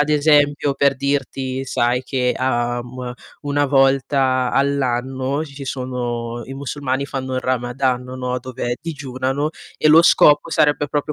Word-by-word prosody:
Ad 150 - +2
esempio, 145 -1 +3
per 140 0 +2
dirti, 135 -1 -2
sai 125 0 +1
che, 125 -1 -1
uhm, 120 0 -2 0.3
1 145 0 0
volta 135 -1 +2
all'anno 135 +1 0
ci 140 -3 -13
ci 140 0 -7
sono 120 -3 -4
i 135 - -7
musulmani 140 0 -3
fanno 130 -1 -4
il 130 - 0
ramadan, 125 0 -1
no, 125 0 -4
dove 125 -1 -4
digiunano 140 -2 -3 0.3
e 155 - +3
lo 155 +2 +8
scopo 150 -3 +5
sarebbe 145 -1 +2
proprio 145 +1 -2
130 Hz, 140 wpm, -20 LUFS, 125-140 Hz, 0.3 s, lo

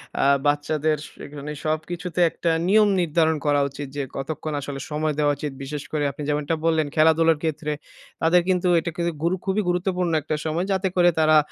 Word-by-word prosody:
অ্যা - - +1 0.2
বাচ্চাদের 150 +1 +1 0.3
এখানে 145 0 -7
সবকিছুতে 170 +3 -3
একটা 165 +1 -1 0.2
নিয়ম 210 +2 +5
নির্ধারণ 160 -1 +2
করা 145 -1 +3
উচিৎ। 140 +1 -7
যে 140 - 0
কতক্ষণ 150 +2 -4
আসলে 135 0 -5
সময় 155 +1 0
দেওয়া 145 -1 +3
উচিৎ। 145 -1 -4
বিশেষ 145 +1 -5
করে 150 -1 -1
আপনি 150 - -8
যেমনটা 150 +2 0
বললেন 160 -2 +2
খেলাধুলার 160 0 +4
ক্ষেত্রে, 155 -1 -2 0.5
তাদের 170 +2 +4
কিন্তু 180 0 +2
এটা 170 +1 -4
কিন্তু 170 0 0
গুরু 175 +2 +2
খুবই 200 +2 +1
গুরুত্বপূর্ণ 180 -1 0
একটা 155 +1 -2
সময়। 160 +3 -1
যাতে 190 0 +1
করে 175 -1 +5
তারা 155 0 +5
155 Hz, 175 wpm, -23 LUFS, 150-175 Hz, 0.5 s, নিয়ম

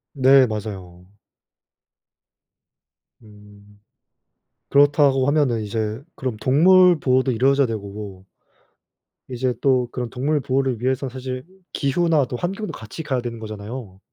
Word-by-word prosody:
네 135 0 +6
맞아요. 95 -5 -7 2.1
음. 105 -1 -18 0.9
그렇다고 140 -2 +4
하면은 145 -6 +1
이제 110 +2 -3
그럼 125 -5 -4
동물 175 +6 +5
보호도 130 0 +1
이루어져야 135 +3 +2
되고 100 -3 -7 1.0
이제 125 0 -1
또 130 -3 +2
그런 125 -2 -4
동물 145 +3 -1
보호를 130 -3 -1
위해서 130 +1 -1
사실 130 +1 -6 0.3
기후나 155 +1 +1
또 125 - -6
환경도 195 - -4
같이 110 +9 -8
가야 130 -4 -2
되는 120 -1 -6
거잖아요. 105 -1 -8
130 Hz, 255 characters per minute, -21 LUFS, 110-140 Hz, 2.1 s, 네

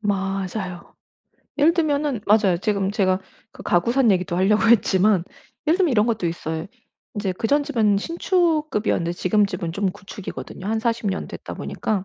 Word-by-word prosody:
맞아요. 195 -2 -3 0.6
예를 305 +3 +5
들면은 295 -7 0
맞아요. 205 -4 +4
지금 200 -1 0
제가 190 -2 +1 0.3
그 - - -11
가구 175 +7 +1
산 255 -4 +4
얘기도 180 -1 0
하려고 210 +4 +3
했지만 195 -4 +4 0.4
예를 325 +3 +4
들면 355 -6 +3
이런 210 0 +3
것도 215 -6 0
있어요. 160 0 -4 0.5
인제 200 -3 -2
그 225 - -3
전 290 +3 +3
집은 225 -8 +2
신축급이었는데 310 - 0
지금 205 +4 +2
집은 180 -3 -4
좀 195 +1 0
구축이거든요. 195 -1 -8
한 220 +1 0
40 230 -2 -1
년 190 - -3
됐다 - - -8
보니까 200 -3 -3
205 Hz, 350 characters per minute, -22 LUFS, 185-235 Hz, 0.6 s, 예를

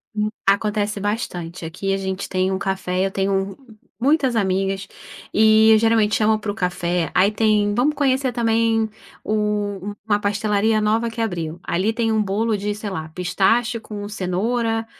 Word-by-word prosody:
Hum. 210 0 0 0.2
Acontece 205 +1 +1
bastante. 180 -5 -4
Aqui 185 +4 -3
a - - 0
gente 190 0 -4
tem 185 0 0
um 190 - -1
café, 190 -1 -1
eu 195 - -2
tenho 195 0 -1
u 240 -4 -19 0.2
muitas 270 -1 +2
amigas, 195 -1 0 0.5
e 220 +1 +6
eu 220 - +7
geralmente 225 -1 +3
chamo 215 0 +3
para 210 -1 -3
o - - -6
café. 180 -3 -1
Aí 195 +3 +4
tem, 210 -1 +2
vamos 270 +7 +1
conhecer 265 -2 +1
também 225 -1 +2 0.4
o 205 -2 -2
uma 205 -2 +2
pastelaria 210 +1 +1
nova 220 +2 +1
que 230 +1 -9
abriu. 170 -7 -3
Ali 185 +6 0
tem 225 -1 0
bolo 210 +3 0
de 205 +1 -3
sei 210 0 -5
lá, 160 -4 -4
pistache 195 +8 +1
com 205 -2 -7
cenoura. 225 +4 -1
210 Hz, 165 wpm, -21 LUFS, 195-225 Hz, 0.5 s, eu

